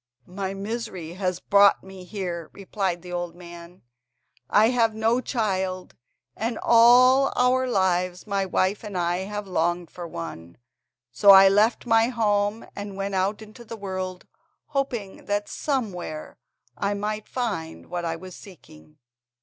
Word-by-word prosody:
"My 190 +1 -5
misery 200 -5 -5
has 185 -1 -2
brought 200 +1 +4
me 190 -1 -11
here," 180 -5 -5
replied 190 -3 -3
the 180 - -9
old 175 -1 -4
man; 175 0 -12 0.7
"I 215 +2 +5
have 230 -3 +2
no 225 +3 +1
child, 190 -7 -2 0.4
and 225 +1 -3
all 250 +3 +6
our 255 +1 +2
lives 185 -4 0
my 200 -2 -1
wife 190 +2 0
and 205 -3 -5
I 175 0 0
have 205 0 -5
longed 175 -1 -1
for 175 -1 -7
one. 85 - -8 0.5
So 130 +11 +3
I 195 0 +10
left 210 +6 +2
my 225 -1 +4
home, 210 -2 0
and 200 -1 -6
went 195 0 -3
out 195 +3 -1
into 215 +3 -13
the 230 0 -8
world, 185 -2 -5 0.4
hoping 255 -9 -3
that 205 0 -1
somewhere 195 - -4 0.4
I 200 0 -1
might 210 +1 -4
find 200 -11 -4
what 175 0 -4
I 165 -1 -2
was 185 +2 -10
seeking." 80 - -16
195 Hz, 145 wpm, -25 LUFS, 180-220 Hz, 0.7 s, I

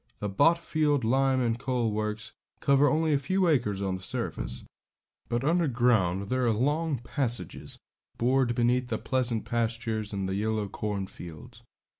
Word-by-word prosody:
The 105 - -3
Botfield 150 - +2
lime 130 +3 +2
and 120 -1 0
coal 125 -4 0
works 105 0 -3 0.3
cover 140 +1 +4
only 160 0 +2
a 140 - +3
few 185 +6 +1
acres 110 - +1
of 95 -1 -1
the - - -12
surface; - - -3 0.7
but 120 +1 -1
underground 120 - +2
there 130 -1 +1
are - - +4
long 145 +6 0
passages 120 0 -2 0.4
bored 125 0 +2
beneath 125 +1 +2
the - - -1
pleasant 125 -4 0
pastures 115 -2 -2
and 100 -2 -2
the 95 - -2
yellow 105 +1 -1
cornfields. 100 +2 -6
120 Hz, 145 wpm, -28 LUFS, 105-135 Hz, 0.7 s, cover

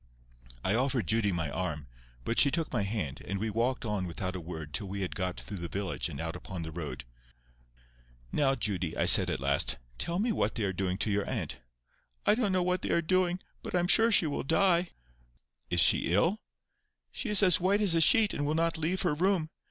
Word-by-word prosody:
I 95 - +2
offered 125 -2 0
Judy 110 -1 +1
my 80 -4 -2
arm, 80 -4 -3 0.4
but 115 - 0
she 140 - +6
took 165 +2 -2
my - - +1
hand, 95 -9 -3
and 100 - -4
we 110 +2 -2
walked 120 +4 -1
on 105 -4 -2
without 90 +2 -4
a - - -4
word 80 -3 -8
till 100 - -3
we 100 +1 -5
had 95 - -3
got 90 -2 -3
through 105 - -7
the 85 - -4
village 95 -2 -3
and 70 -4 -7
out 80 0 -4
upon 90 -1 -7
the 80 - -6
road. 75 -6 -6 1.3
"Now, 135 -2 +2
Judy," 95 -9 -2
I - - +1
said - - +7
at - - -2
last, - - +1 0.2
"tell 170 +1 -2
me 225 +5 +1
what - - -1
they 115 - -2
are 95 -1 -1
doing 95 0 -2
to 105 - 0
your 100 0 -1
aunt?" - - -4 0.7
"I - - +5
don't 215 -3 0
know 185 -1 +1
what 180 +1 0
they - - -4
are 170 - +2
doing. 185 +1 +1 0.2
But - - -5
I - - +3
am 175 - 0
sure 225 +4 +5
she 195 - +4
will 145 - -2
die." 175 +3 +2 0.8
"Is - - +1
she - - +4
ill?" 165 - +2 0.7
"She 240 - -5
is 210 -1 +4
as 180 -2 +5
white 195 +3 +2
as 200 -5 +4
a 165 - +3
sheet, 220 +4 +5
and 145 - -2
will 150 +2 0
not 165 0 0
leave 175 +5 -1
her 175 -4 +1
room. 170 0 0
115 Hz, 225 wpm, -29 LUFS, -, 1.3 s, said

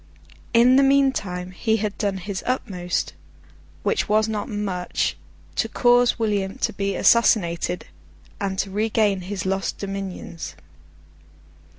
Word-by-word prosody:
In 245 +2 +6
the - - +6
meantime 265 -10 +2
he 220 +4 0
had 210 -1 -2
done 200 -2 0
his 190 +1 -5
utmost 180 -8 -2 0.7
(which 450 - 0
was 215 +1 +3
not 215 -2 -3
much) 195 -4 -2 0.4
to - - +1
cause 245 0 +4
William 205 -4 -1
to - - -1
be 195 0 -2
assassinated, 180 -7 +3 0.5
and 195 -1 -2
to 195 0 -1
regain 210 -1 +1
his 190 0 -5
lost 195 0 -1
dominions. 195 -4 -6
200 Hz, 120 wpm, -23 LUFS, 190-225 Hz, 0.7 s, In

